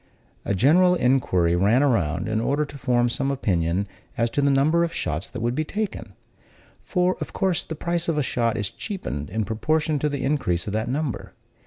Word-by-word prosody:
A 100 - 0
general 175 - +5
inquiry 120 - +2
ran 105 +9 +3
around, 90 - +1
in 110 0 0
order 145 +5 +1
to 140 - -12
form 120 -2 +2
some 135 +3 -1
opinion 95 -7 0 0.3
as 115 +1 +1
to 145 - 0
the 140 - +3
number 150 +5 +3
of 170 - -1
shots 80 - -3
that 125 - -6
would 120 +1 +1
be 155 - 0
taken; 210 +6 -4 0.7
for, 180 0 +1
of - - -5
course, 185 -3 +1
the 160 - -6
price 170 +2 -2
of 165 -2 0
a 150 - +2
shot 115 -2 0
is 105 -2 -1
cheapened 125 - -5
in 110 -1 -2
proportion 150 +8 0
to 150 - 0
the 140 -2 -3
increase 125 - 0
of 105 - -4
that 110 +2 -1
number. 140 -1 -3
130 Hz, 200 wpm, -24 LUFS, 110-155 Hz, 0.7 s, general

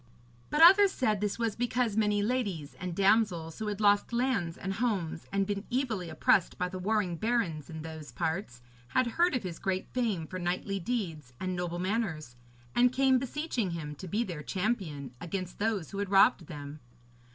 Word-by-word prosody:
But 305 +2 +4
others 390 +3 +8
said 215 - 0
this 210 -1 -1
was 230 -3 -1
because 240 -2 0
many 210 -1 +2
ladies 205 - -2
and 180 -2 -4
damsels, 190 -5 +2
who 215 - -3
had 205 -1 -3
lost 205 +1 +3
lands 235 -9 0
and 195 +1 -3
homes 195 -8 -2
and 195 0 +1
been 200 0 -2
evilly 230 -9 -1
oppressed 160 +3 +2
by 180 - -1
the 185 0 -6
warring 195 -3 0
barons 190 - -1
in 160 -1 -7
those 160 -2 -8
parts, 160 - -3 0.2
had 255 - +2
heard 335 +7 +2
of 250 - -1
his 175 -3 -5
great 190 -1 -1
fame 220 -10 0
for 185 +4 -6
knightly 185 +3 -2
deeds 170 - -3
and 185 -1 -2
noble 175 -1 -3
manners, 175 - -2 0.4
and 245 0 +4
came 265 0 +4
beseeching 265 - -2
him 150 -2 -5
to 185 +6 -9
be 210 +7 0
their 175 -9 -5
champion 165 - -2
against 180 +1 -5
those 205 -6 -1
who 200 - -5
had 200 -1 -2
robbed 195 -3 +5
them. 145 -1 -8
195 Hz, 185 wpm, -30 LUFS, 170-230 Hz, 0.4 s, others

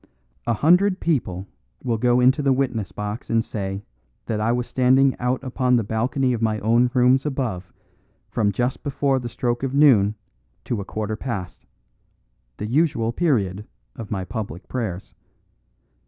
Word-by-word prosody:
A 115 - +2
hundred 180 - +4
people 100 - -1 0.4
will 115 -3 -1
go 125 +1 +3
into 130 +4 +4
the 140 -1 +2
witness 125 -6 -1
box 105 +4 -5
and 115 0 +2
say 95 -1 -4 0.4
that 110 -2 -2
I 110 +2 +2
was 120 0 0
standing 130 +2 +3
out 125 +2 -1
upon 125 -1 +1
the 115 - +2
balcony 125 +5 0
of 115 - -3
my 110 -1 +1
own 120 +3 +3
rooms 125 +1 +4
above 120 - -3 0.6
from 105 -2 +1
just 125 +5 -1
before 140 -2 0
the 120 -1 -5
stroke 120 +1 -2
of 135 0 -2
noon 110 -9 +5 0.5
to 115 -5 -2
a - - -7
quarter 110 +1 -3
past 105 -7 -6 0.9
the 105 - -4
usual 125 -2 +1
period 105 - 0 0.3
of 110 - -8
my 95 -3 -3
public 100 -4 -6
prayers. 105 -8 -4
120 Hz, 155 wpm, -23 LUFS, 105-130 Hz, 0.9 s, noon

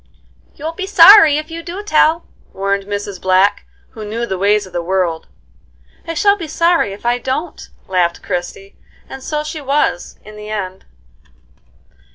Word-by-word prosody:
"You'll 310 +2 -5
be 385 +2 -5
sorry 390 -5 +8
if 310 +1 -6
you 335 0 -6
do 355 +4 -7
tell," 325 -3 +2 0.3
warned 195 0 -2
Mrs. 205 -2 -5
Black, 190 +2 +2 0.2
who 220 - -9
knew 225 +3 -4
the 190 -5 -4
ways 205 +1 +2
of 185 - -15
the 175 - -2
world. 175 -2 -2 0.8
"I 330 - -4
shall 405 +6 +3
be 340 -5 -7
sorry 335 - +1
if 200 +4 -11
I 240 +1 +1
don't," 265 +7 -5 0.2
laughed 180 -2 0
Christie, 185 +2 -6 0.3
and 265 - -9
so 300 +3 -3
she 305 0 -6
was, 280 -9 -1
in 215 0 -12
the 210 0 -9
end. 190 -3 -5
220 Hz, 165 wpm, -16 LUFS, 195-320 Hz, 0.8 s, sorry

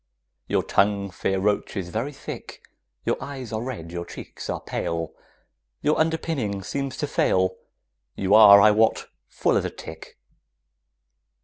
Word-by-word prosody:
Your - - +1
tongue, 100 -1 +1
fair 95 0 -1
roach, 105 +1 0
is 90 -3 -3
very 115 +10 -3
thick, 135 - -9 0.4
Your - - +1
eyes 130 -5 -7
are 110 - -2
red, 115 -10 -6
your 85 0 -4
cheeks 85 - -9
are - - -2
pale, 85 -1 -3 0.7
Your 150 - +2
underpinning 160 -11 -1
seems 140 +6 -4
to - - -1
fail, 95 -8 +1 0.6
You 100 +1 0
are, 105 -2 +10
I 105 +1 +7
wot, 110 +1 +2 0.2
full - - +1
as - - 0
a - - -1
tick. 80 0 -11
105 Hz, 145 wpm, -24 LUFS, 95-130 Hz, 0.7 s, are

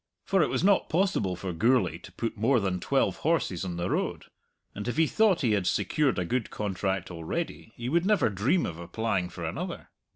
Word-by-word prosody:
For 195 -2 +3
it - - +2
was - - -1
not 200 0 +3
possible 170 - +1
for 90 0 -5
Gourlay 95 - +2
to 90 - -13
put 115 +3 -3
more 120 +4 +3
than 95 -3 -1
twelve 135 +9 +1
horses 145 - 0
on 90 -2 -4
the 85 +1 -1
road, - - -2 0.5
and 105 +3 -6
if 120 - -2
he 160 - +5
thought 210 +1 +3
he 120 -6 +2
had 100 -4 +1
secured 150 -7 +1
a 90 - 0
good 125 +4 -1
contract 95 -2 -2
already, 90 - -4
he 120 - -5
would 170 +7 +2
never 210 - +3
dream 115 - +1
of 85 -1 -5
applying 95 0 -1
for - - -6
another. - - -5
110 Hz, 205 wpm, -28 LUFS, 90-155 Hz, 0.5 s, he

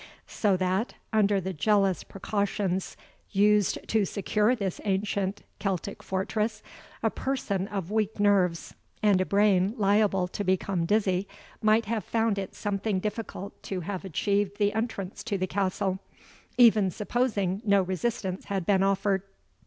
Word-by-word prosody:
So 200 -4 +1
that, 185 +5 -1 0.2
under 205 -2 +3
the 190 0 -4
jealous 195 +2 +2
precautions 195 -2 -2 0.3
used 205 0 +2
to 220 -2 +3
secure 210 +4 +1
this 195 -6 -3
ancient 200 0 -1 0.2
Celtic 195 0 -3
fortress, 215 +3 -2 0.4
a 225 - +2
person 200 -8 -2
of 195 -3 -4
weak 215 -1 0
nerves, 190 -5 +2 0.3
and 200 -3 +4
a 185 - -1
brain 200 0 +3
liable 200 -2 +3
to 205 - -4
become 185 -2 0
dizzy, 195 -2 +1 0.3
might 215 +1 +4
have 220 -1 -2
found 225 -1 0
it 195 - -6
something 205 -1 -1
difficult 210 -1 -5
to 190 -2 -4
have 185 +2 -4
achieved 200 +3 0
the 205 -1 +2
entrance 205 -3 -3
to 210 -4 -1
the 185 - 0
castle, 190 0 -1 0.6
even 220 -5 +6
supposing 205 -1 -1
no 200 -3 +4
resistance 190 0 -2
had 195 -3 -2
been 195 0 +3
offered. 195 0 +2
200 Hz, 140 wpm, -27 LUFS, 190-210 Hz, 0.6 s, even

